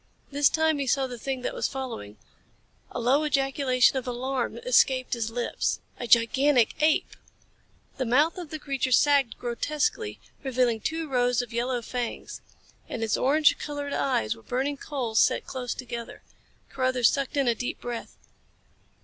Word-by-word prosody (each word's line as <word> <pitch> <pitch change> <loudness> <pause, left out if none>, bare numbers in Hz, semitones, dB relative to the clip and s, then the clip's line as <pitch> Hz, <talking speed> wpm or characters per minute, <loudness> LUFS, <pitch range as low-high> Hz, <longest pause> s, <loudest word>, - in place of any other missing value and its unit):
This 285 0 +4
time 315 -2 +1
he 275 - -2
saw 270 +1 +2
the 245 -2 -7
thing 265 +1 -3
that - - -2
was - - -1
following. 235 - -6 0.7
A - - -5
low 260 +6 +3
ejaculation 270 -3 +2
of 260 - -4
alarm 250 +1 -2
escaped 260 - +3
his 230 -2 -1
lips. 240 +1 -1 0.2
A 240 - -4
gigantic 240 +2 +4
ape! 310 0 +2 0.8
The 260 - -1
mouth 295 +9 +2
of 345 -4 -7
the 310 - -5
creature 275 -3 -2
sagged 280 -1 +4
grotesquely, 305 - -2 0.2
revealing 250 -4 +1
two 320 +8 -3
rows 245 -2 +1
of 240 -1 -10
yellow 240 +1 -1
fangs. 245 0 -5 0.5
And 225 - -3
its 220 - +1
orange 300 +4 +4
colored 290 -1 -4
eyes 110 - 0
were - - -16
burning 270 - -2
coals 250 -7 -2
set - - +3
close 250 -3 -4
together. 235 -2 -7 0.5
Carruthers 255 -2 +2
sucked 275 0 -2
in 275 -2 +2
a 235 - +4
deep 245 +2 -4
breath. 240 -1 -6
260 Hz, 160 wpm, -27 LUFS, 240-285 Hz, 0.8 s, This